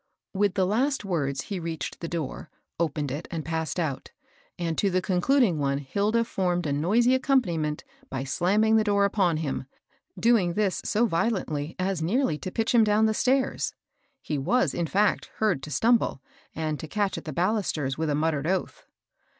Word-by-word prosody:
With 200 Hz, 0 st, +1 dB
the 190 Hz, -, +2 dB
last 250 Hz, +5 st, 0 dB
words 140 Hz, -8 st, -1 dB
he 195 Hz, +4 st, -5 dB
reached 165 Hz, -1 st, -5 dB
the 170 Hz, -, -4 dB
door, 165 Hz, -5 st, -5 dB, 0.3 s
opened 150 Hz, -4 st, -1 dB
it 145 Hz, +5 st, -5 dB
and 165 Hz, -3 st, -4 dB
passed 160 Hz, +1 st, -2 dB
out, 155 Hz, -6 st, -3 dB, 0.5 s
and 165 Hz, -2 st, -2 dB
to 200 Hz, -, +2 dB
the 185 Hz, 0 st, +1 dB
concluding 190 Hz, -, +2 dB
one 140 Hz, -1 st, +1 dB
Hilda 205 Hz, +11 st, 0 dB
formed 180 Hz, -6 st, -1 dB
a 145 Hz, -, 0 dB
noisy 215 Hz, -, +3 dB
accompaniment 180 Hz, -, +1 dB, 0.3 s
by 135 Hz, -1 st, -3 dB
slamming 205 Hz, +10 st, +2 dB
the 220 Hz, -, +3 dB
door 200 Hz, -1 st, +3 dB
upon 190 Hz, -5 st, +2 dB
him, 140 Hz, -4 st, -3 dB, 0.5 s
doing 220 Hz, -7 st, +3 dB
this 205 Hz, -3 st, 0 dB
so 220 Hz, +3 st, +2 dB
violently 165 Hz, -7 st, -1 dB
as 185 Hz, -2 st, -1 dB
nearly 180 Hz, -, +1 dB
to -, -, -5 dB
pitch 225 Hz, +5 st, -1 dB
him 235 Hz, -2 st, +6 dB
down 215 Hz, +1 st, +3 dB
the 220 Hz, -, +2 dB
stairs. 260 Hz, +4 st, 0 dB, 0.5 s
He 150 Hz, -, -2 dB
was, 250 Hz, -, +1 dB
in 170 Hz, -1 st, -1 dB
fact, 205 Hz, +5 st, +1 dB
heard 210 Hz, -10 st, +1 dB
to 150 Hz, -, -7 dB
stumble, 225 Hz, -, +2 dB, 0.4 s
and 155 Hz, -1 st, -2 dB
to 160 Hz, -, -6 dB
catch 200 Hz, +3 st, -1 dB
at -, -, -16 dB
the 155 Hz, -, -4 dB
balusters 170 Hz, -6 st, 0 dB
with 160 Hz, +1 st, -2 dB
a 145 Hz, -, +1 dB
muttered 150 Hz, -1 st, 0 dB
oath. 185 Hz, +1 st, -2 dB
180 Hz, 180 wpm, -26 LUFS, 155-215 Hz, 0.5 s, him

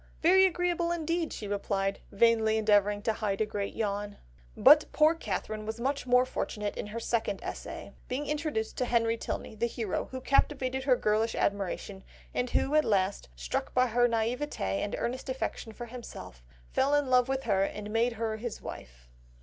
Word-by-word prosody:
"'Very 380 Hz, +3 st, +7 dB
agreeable 350 Hz, -1 st, 0 dB
indeed,' 335 Hz, 0 st, -1 dB
she 210 Hz, -, -6 dB
replied, 200 Hz, -1 st, -1 dB
vainly 220 Hz, +1 st, +3 dB
endeavouring 205 Hz, -1 st, +3 dB
to 225 Hz, -, +1 dB
hide 205 Hz, -3 st, -2 dB
a 220 Hz, -, +2 dB
great 205 Hz, -1 st, -4 dB
yawn." 205 Hz, -1 st, -2 dB, 0.4 s
But 300 Hz, +2 st, +7 dB
poor 310 Hz, +1 st, +5 dB
Catherine 215 Hz, -, -4 dB
was 220 Hz, +2 st, -5 dB
much 270 Hz, +1 st, -2 dB
more 250 Hz, +1 st, +5 dB
fortunate 210 Hz, -4 st, -3 dB
in -, -, -5 dB
her 220 Hz, +3 st, -5 dB
second 225 Hz, -4 st, -1 dB
essay, -, -, -7 dB
being 270 Hz, +4 st, -2 dB
introduced 295 Hz, -7 st, -2 dB
to 250 Hz, -, +1 dB
Henry 230 Hz, -1 st, +2 dB
Tilney, 225 Hz, -, -5 dB
the 225 Hz, +2 st, 0 dB
hero, 225 Hz, -4 st, -3 dB
who 260 Hz, -, -5 dB
captivated 265 Hz, -1 st, +1 dB
her 260 Hz, -3 st, +5 dB
girlish 220 Hz, 0 st, +1 dB
admiration, 200 Hz, 0 st, -2 dB, 0.3 s
and 250 Hz, 0 st, -1 dB
who 275 Hz, -, +1 dB
at 305 Hz, 0 st, +5 dB
last, 195 Hz, -, 0 dB
struck -, -, -3 dB
by 255 Hz, 0 st, +5 dB
her 240 Hz, +2 st, +4 dB
naïvété 240 Hz, +5 st, -1 dB, 0.2 s
and 205 Hz, -, -2 dB
earnest 255 Hz, +3 st, -3 dB
affection 260 Hz, -3 st, -3 dB
for 240 Hz, +2 st, -7 dB
himself, 225 Hz, -, -9 dB, 0.3 s
fell 280 Hz, +2 st, +2 dB
in 290 Hz, -1 st, +2 dB
love 250 Hz, 0 st, +4 dB
with 270 Hz, 0 st, -1 dB
her 200 Hz, -4 st, +2 dB
and 210 Hz, +1 st, -4 dB
made 230 Hz, +2 st, +2 dB
her 220 Hz, -1 st, -2 dB
his 230 Hz, 0 st, -5 dB
wife. -, -, -10 dB
230 Hz, 180 wpm, -29 LUFS, 210-265 Hz, 0.4 s, Very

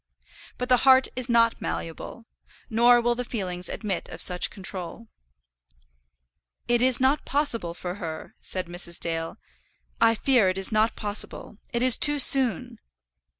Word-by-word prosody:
But 250 Hz, -, -4 dB
the 250 Hz, 0 st, +4 dB
heart 260 Hz, +1 st, +4 dB
is 255 Hz, 0 st, -2 dB
not 230 Hz, -1 st, +2 dB
malleable; 165 Hz, +7 st, -6 dB, 0.5 s
nor 240 Hz, +2 st, +5 dB
will 240 Hz, 0 st, +1 dB
the 250 Hz, +1 st, -4 dB
feelings 180 Hz, -7 st, -4 dB
admit 200 Hz, -5 st, -4 dB
of -, -, -9 dB
such 180 Hz, -1 st, +2 dB
control. 195 Hz, +2 st, -7 dB, 1.6 s
"It 240 Hz, 0 st, +2 dB
is 255 Hz, -1 st, +4 dB
not 265 Hz, +3 st, +1 dB
possible 235 Hz, -, -1 dB
for 175 Hz, 0 st, -6 dB
her," 160 Hz, -2 st, -7 dB
said 185 Hz, -1 st, -3 dB
Mrs. 175 Hz, 0 st, -1 dB
Dale. 165 Hz, -1 st, -3 dB, 0.6 s
"I 230 Hz, 0 st, +4 dB
fear 235 Hz, -4 st, +2 dB
it 185 Hz, -, -3 dB
is 195 Hz, +2 st, 0 dB
not 220 Hz, +1 st, +1 dB
possible. 210 Hz, 0 st, -4 dB
It 235 Hz, +1 st, -1 dB
is 255 Hz, -2 st, +4 dB
too 295 Hz, 0 st, +6 dB
soon." 260 Hz, -, 0 dB
230 Hz, 150 wpm, -25 LUFS, 185-250 Hz, 1.6 s, too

